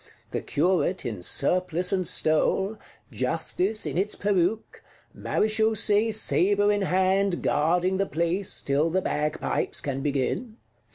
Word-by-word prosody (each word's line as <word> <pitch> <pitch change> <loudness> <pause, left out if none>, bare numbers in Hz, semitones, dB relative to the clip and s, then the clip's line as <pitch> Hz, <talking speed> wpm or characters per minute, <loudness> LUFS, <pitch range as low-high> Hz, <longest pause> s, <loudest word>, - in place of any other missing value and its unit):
The - - -2
Curate 180 +4 0
in 105 -6 -4
surplice 180 - +1
and 185 -2 0
stole; 190 +6 +1 0.3
Justice 165 - -1
in - - -2
its 205 +2 -1
peruke; 200 +1 -1 0.3
Marechausee 220 0 +1
sabre 205 -1 +2
in 205 0 0
hand, 190 0 +1
guarding 175 +5 +1
the 195 0 0
place, 170 +4 -2
till 145 +4 +1
the 185 +3 0
bagpipes 150 -1 -2
can 135 -1 -3
begin. 145 - -2
185 Hz, 120 wpm, -25 LUFS, 155-205 Hz, 0.3 s, sabre